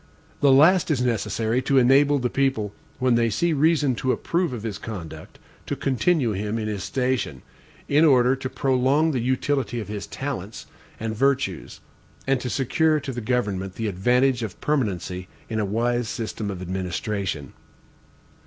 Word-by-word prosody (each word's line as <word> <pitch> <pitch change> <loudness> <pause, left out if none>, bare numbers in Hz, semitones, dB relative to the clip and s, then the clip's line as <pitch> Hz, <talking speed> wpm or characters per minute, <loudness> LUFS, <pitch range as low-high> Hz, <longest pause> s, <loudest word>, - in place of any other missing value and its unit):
The 140 - +5
last 160 +7 +5
is 150 -5 +1
necessary 115 0 0
to 135 +1 +1
enable 135 +3 +5
the 125 -2 -1
people, 130 -7 0 0.2
when 130 -1 +2
they 115 0 +3
see 170 +8 +1
reason 150 -2 +3
to 130 - 0
approve 170 +2 -1
of 120 -4 -6
his 105 -3 -4
conduct, 80 -8 -8 0.3
to - - -2
continue 135 -1 +1
him 105 +2 -2
in 110 -1 -3
his 105 -4 -3
station, 125 - -2 0.4
in 145 +3 +4
order 130 -4 +5
to 130 0 -5
prolong 135 +4 +2
the 130 - -1
utility 130 0 -1
of 105 - -6
his 105 -2 -5
talents 120 -7 -5 0.3
and 110 0 -3
virtues, 130 -7 -1 0.4
and 135 -1 +1
to 125 - -3
secure 155 +5 +2
to 140 - -5
the 120 - -4
government 105 -6 -1
the 115 - -3
advantage 125 +6 +2
of 110 -5 -5
permanency 95 - -2 0.2
in 110 -1 -2
a 105 - +1
wise 120 +3 0
system 110 -2 -4
of 95 -2 -5
administration. 95 -3 -3
125 Hz, 160 wpm, -24 LUFS, 105-135 Hz, 0.4 s, The